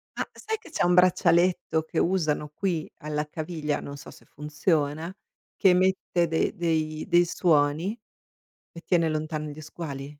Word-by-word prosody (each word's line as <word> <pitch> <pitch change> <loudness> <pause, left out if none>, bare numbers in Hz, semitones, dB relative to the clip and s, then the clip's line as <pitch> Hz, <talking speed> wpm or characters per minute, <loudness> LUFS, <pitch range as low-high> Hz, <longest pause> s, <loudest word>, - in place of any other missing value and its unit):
Ma - - -3
sai 440 -1 -4
che - - -15
c'è - - -1
un 175 - +3
braccialetto 180 -2 +3
che 160 - -7
usano 155 -5 +1
qui 165 0 -2
alla 150 -1 -3
caviglia, 155 -1 -3
non 140 0 -8
so - - -11
se - - -17
funziona, 150 +2 -1 0.4
che 195 - +4
emette 180 -1 +2
de 160 0 0
dei 155 -2 -1
dei 175 -2 +4
suoni 165 +5 +1 0.7
e 170 - -11
tiene 170 -3 +2
lontani 155 0 -3
gli 155 - -10
squali? 150 -3 -7
160 Hz, 155 wpm, -26 LUFS, 150-180 Hz, 0.7 s, che